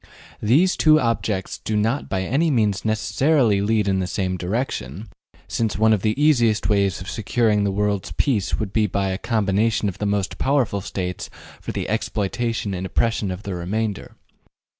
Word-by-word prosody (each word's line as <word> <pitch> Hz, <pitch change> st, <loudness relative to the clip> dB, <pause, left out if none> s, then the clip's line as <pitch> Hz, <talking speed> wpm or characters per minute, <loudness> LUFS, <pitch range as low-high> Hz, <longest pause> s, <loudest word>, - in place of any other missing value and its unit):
These 150 Hz, -, +3 dB
two 155 Hz, -1 st, +5 dB
objects 110 Hz, -6 st, -1 dB
do 110 Hz, -, -2 dB
not 115 Hz, +7 st, 0 dB
by 95 Hz, -1 st, -1 dB
any 140 Hz, -, +1 dB
means 105 Hz, -8 st, +1 dB
necessarily 110 Hz, +1 st, +2 dB
lead 105 Hz, 0 st, +1 dB
in 95 Hz, -1 st, +1 dB
the 90 Hz, -, -1 dB
same 95 Hz, -1 st, -2 dB
direction, 95 Hz, -, -3 dB, 0.4 s
since 110 Hz, -2 st, -1 dB
one 110 Hz, +1 st, +4 dB
of 105 Hz, -, +1 dB
the 110 Hz, +6 st, 0 dB
easiest 120 Hz, -8 st, +3 dB
ways 100 Hz, -3 st, +1 dB
of 90 Hz, -, -8 dB
securing 110 Hz, -1 st, +1 dB
the 100 Hz, -, +1 dB
world's 100 Hz, -3 st, -1 dB
peace 105 Hz, -, 0 dB
would 105 Hz, -3 st, -3 dB
be 110 Hz, -2 st, +2 dB
by 100 Hz, 0 st, -1 dB
a 95 Hz, +1 st, -3 dB
combination 110 Hz, -1 st, +1 dB
of 95 Hz, -, -5 dB
the 105 Hz, -, -1 dB
most 100 Hz, -1 st, -1 dB
powerful 130 Hz, -7 st, +1 dB
States 90 Hz, -2 st, -4 dB, 0.3 s
for -, -, -5 dB
the -, -, -3 dB
exploitation 110 Hz, 0 st, -2 dB
and 95 Hz, 0 st, -3 dB
oppression 110 Hz, -1 st, 0 dB
of 90 Hz, +2 st, -5 dB
the 100 Hz, -, -4 dB
remainder. 100 Hz, +4 st, -3 dB
105 Hz, 175 wpm, -22 LUFS, 95-115 Hz, 0.4 s, two